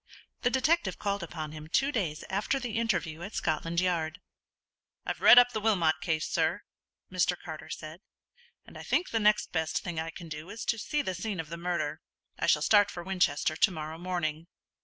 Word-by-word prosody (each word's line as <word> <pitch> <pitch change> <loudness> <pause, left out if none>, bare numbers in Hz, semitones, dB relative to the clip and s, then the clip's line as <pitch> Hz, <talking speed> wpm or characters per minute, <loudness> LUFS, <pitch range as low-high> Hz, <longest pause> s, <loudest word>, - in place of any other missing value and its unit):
The 245 - +3
detective 265 - +1
called 200 -1 -2
upon 160 -3 -5
him 155 0 -9
two 275 - +2
days 170 - -2
after 205 +8 0
the 235 -3 -2
interview 185 -8 -1
at 200 +5 -7
Scotland 165 +1 0
Yard. 170 -2 0 0.9
"I've - - -3
read - - +9
up 245 0 +8
the 220 - -2
Wilmot 190 -8 +2
case, 160 -3 -1
sir," - - 0 0.5
Mr. 180 -1 +1
Carter 155 -1 -8
said; 155 +3 -7 0.6
"and - - -12
I - - -7
think 355 - 0
the 225 - +1
next 210 0 +3
best 160 -2 -1
thing 175 -3 -3
I 160 +1 -3
can 165 +1 -9
do 155 +2 -7
is 220 - -6
to 230 - 0
see 295 +7 -1
the 185 - -2
scene 190 +1 -4
of 160 -2 -5
the 170 - -5
murder. 170 -3 -2 0.4
I - - 0
shall - - +4
start 205 -1 +5
for 175 - -7
Winchester 170 -5 +1
to 215 - +5
morrow 160 -2 -6
morning." 170 -3 -2
175 Hz, 200 wpm, -29 LUFS, 160-210 Hz, 0.9 s, read